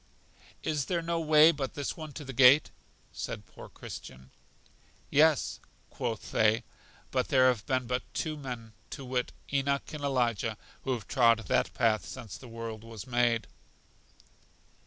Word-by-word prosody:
Is 150 -3 0
there 170 -2 -1
no 170 0 -1
way 155 0 +7
but 140 -4 -4
this 145 -2 -3
one 155 -2 -7
to 150 - -7
the 135 - -6
gate? 135 +4 +6 0.4
said - - -5
poor - - -12
Christian. 65 0 -10 0.8
Yes, 155 0 +4 0.3
quoth 115 -3 -4
they, 110 +2 +3 0.5
but 130 -1 +1
there 130 -3 +5
have 115 -4 -2
been 130 -1 +1
but 125 +1 -1
two 155 -1 -1
men, 125 -6 -7 0.2
to 140 - -7
wit, 125 -1 -1 0.2
Enoch 140 +1 0
and 150 -1 -6
Elijah 120 -5 0 0.3
who 130 - +1
have 115 -6 -5
trod 115 -3 +5
that - - +1
path 110 -2 +2
since 105 -5 -8
the 130 - -11
world 115 -1 -6
was 115 -3 -9
made. 120 -2 +2
125 Hz, 155 wpm, -30 LUFS, 115-145 Hz, 0.8 s, way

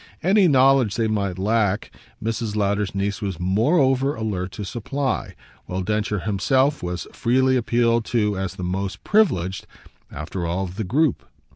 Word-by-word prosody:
Any 190 +2 +5
knowledge 135 -6 +4
they 115 -1 +1
might 100 -4 -1
lack 105 0 0 0.3
Mrs. 115 -1 -2
Lowder's 100 -1 0
niece 100 +2 -2
was 95 -5 -3
moreover 130 - +2
alert 100 -5 -3
to 105 - -6
supply, 130 +7 -3 0.3
while 95 +1 -3
Densher 105 0 -1
himself 130 - +1
was 90 0 -4
freely 130 +2 +2
appealed 115 -1 +2
to 105 -4 0
as 95 -1 -3
the 90 - -6
most 95 +2 -3
privileged, 95 - +1 0.4
after 90 - -5
all, 90 +3 -1
of 95 0 -7
the 110 - -1
group. 145 - +1
105 Hz, 150 wpm, -23 LUFS, 95-130 Hz, 0.4 s, Any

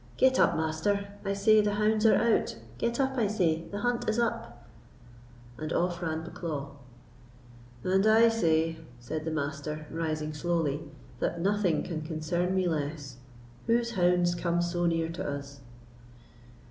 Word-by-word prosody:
Get 260 0 +4
up, - - +4
Master; 180 +6 -1
I 200 -1 -1
say 215 +2 +5
the 205 0 0
hounds 215 +1 +3
are - - +6
out—get 235 +1 0
up, 265 -1 +1
I 220 - +3
say; 170 -6 0
the 205 0 -5
hunt 245 -2 0
is 220 - 0
up." 120 - -2 0.9
And 155 +1 -4
off 175 0 0
ran 160 -1 -2
Bucklaw. 155 -4 -5 1.1
"And 190 +3 +2
I 225 +1 +6
say," 165 -6 +1 0.2
said 155 +6 -5
the 160 - -2
Master, 150 0 -3
rising 155 -1 -2
slowly, 160 -2 -1 0.4
"that 170 - -1
nothing 190 -3 +1
can 165 -3 -4
concern 175 +3 -1
me 185 -1 +2
less. 145 -4 -3 0.5
Whose 235 0 +2
hounds 175 -3 +3
come 175 0 0
so 175 0 0
near 165 -1 0
to 165 - -5
us?" 140 0 -6
175 Hz, 145 wpm, -29 LUFS, 155-205 Hz, 1.1 s, are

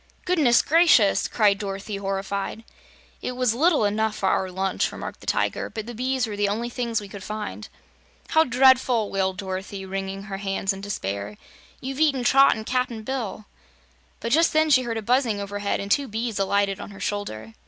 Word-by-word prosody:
"Goodness 305 -10 +4
gracious!" 310 - +4
cried 205 -3 +2
Dorothy 200 0 -4
horrified. 195 +2 -3 0.6
"It 250 - -3
was 250 -2 +1
little 295 -2 +3
enough 215 +1 0
for 195 - 0
our 190 - 0
lunch," 190 +1 -1
remarked - - -7
the - - -14
Tiger, - - 0
"but 220 -1 -6
the 240 - -7
bees 255 +2 0
were 215 -2 -5
the 205 0 +1
only 230 +4 -2
things 235 -2 -1
we 205 - -9
could 195 -1 -9
find." 215 0 -6 0.6
"How 320 - +5
dreadful!" 250 -4 +3
wailed 190 -1 0
Dorothy, 190 0 -5
wringing 195 +1 -4
her 200 -2 -6
hands 195 0 -1
in 195 - -8
despair. 100 - -4 0.4
"You've 265 +2 -5
eaten 285 -5 +2
Trot 270 +3 +5
and 220 0 -7
Cap'n 250 -3 -1
Bill." 225 -4 -4 0.7
But 230 - -4
just 325 +4 +4
then 310 0 +3
she 255 -2 +6
heard 235 -2 -3
a 220 - -4
buzzing 240 -2 +1
overhead 200 0 -2
and 200 0 -5
two 280 +4 +2
bees 225 -1 -3
alighted 200 0 +1
on - - -7
her 195 - -12
shoulder. 115 - -4
215 Hz, 185 wpm, -24 LUFS, 195-250 Hz, 0.7 s, she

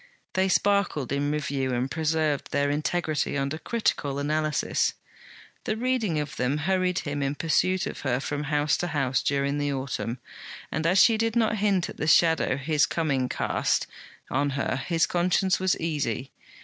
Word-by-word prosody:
They 190 +1 +2
sparkled 195 -9 +1
in 140 +1 0
review 140 -3 -1
and 125 +2 -2
preserved 155 -2 0
their 145 0 +1
integrity 155 0 -1
under 140 +3 -2
critical 150 -12 -1
analysis. 150 +1 0 0.7
The 215 - -1
reading 230 -9 0
of 150 -1 -5
them 125 +4 0
hurried 185 -1 +1
him 145 0 -2
in 140 +1 -1
pursuit 185 +4 +1
of - - -5
her 125 - 0
from 145 +2 -3
house 150 0 +1
to 175 - -2
house 135 -6 0
during 140 +1 0
the 145 0 0
autumn; 130 -3 -3 0.5
and 160 +2 -1
as 180 +3 +3
she 225 -2 +4
did 225 0 0
not 220 -2 +2
hint 195 -3 +1
at - - -9
the 150 - -2
shadow 160 -4 +4
his 145 +1 +2
coming 140 -6 0
cast - - 0 0.5
on 140 +2 +1
her, 130 -2 -1
his 165 -2 +2
conscience 180 +1 +1
was 185 -1 +1
easy. 145 -6 -2
150 Hz, 165 wpm, -26 LUFS, 140-180 Hz, 0.7 s, she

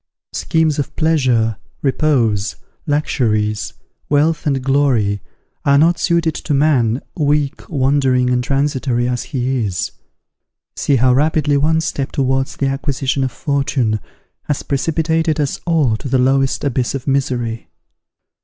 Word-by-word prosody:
Schemes 160 -2 +1
of 145 - -3
pleasure, 125 -9 +2 0.3
repose, 125 -8 +1 0.3
luxuries, 110 -8 0 0.4
wealth, 150 +2 +2
and 135 -3 0
glory 125 -8 +1 0.4
are 140 0 +4
not 165 +4 +3
suited 170 -2 +1
to 150 0 -2
man, 135 -5 +2
weak, 145 -2 0
wandering, 130 -3 +2
and 125 0 +1
transitory 130 -3 0
as 125 -1 -2
he 130 -3 -1
is. 95 -4 -2 0.8
See 140 - +1
how 125 0 +4
rapidly 150 +1 +2
one 160 +3 +2
step 140 -4 -3
towards 135 0 0
the 140 - 0
acquisition 135 0 -1
of 130 - -1
fortune 130 -3 0 0.5
has 145 - -2
precipitated 160 +2 0
us 145 -2 -1
all 150 -9 +2
to 135 - -7
the 130 - +2
lowest 135 +1 +2
abyss 130 -2 -1
of 130 - -5
misery! 125 -4 -1
135 Hz, 130 wpm, -18 LUFS, 125-150 Hz, 0.8 s, are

